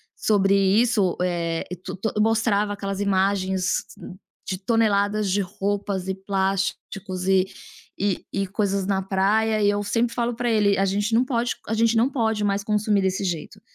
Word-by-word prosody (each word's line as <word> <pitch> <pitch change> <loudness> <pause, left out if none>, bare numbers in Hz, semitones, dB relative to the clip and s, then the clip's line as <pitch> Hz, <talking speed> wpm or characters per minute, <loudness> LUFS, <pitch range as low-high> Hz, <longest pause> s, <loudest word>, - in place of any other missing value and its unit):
sobre 195 -2 +2
isso, 200 0 +2
eh, 170 -2 -1 0.2
tu - - -6
to 210 +4 -2
mostrava 215 -2 +2
aquelas 195 -1 -4
imagens 190 -1 +1 0.6
de 190 - -2
toneladas 205 -1 +1
de 200 +2 +2
roupas 195 0 -3
e 190 - 0
plásticos, 190 -1 -2
e 190 -1 +4 0.5
e 200 -2 -1
e 195 -1 -1
coisas 195 -1 -1
na 195 -1 +1
praia, 210 +3 +1
e 205 - +4
eu 205 0 0
sempre 230 +3 0
falo 240 -1 -1
para 240 0 -1
ele: 205 -3 +3
"A 195 - +3
gente 205 +3 -1
não 245 - +4
pode 240 -2 0
a 220 - -2
gente 230 +1 +2
não 245 +4 +3
pode 220 -5 0
mais 200 0 0
consumir 210 -1 +1
desse 190 +1 0
jeito. 180 +3 -4
200 Hz, 165 wpm, -23 LUFS, 190-215 Hz, 0.6 s, e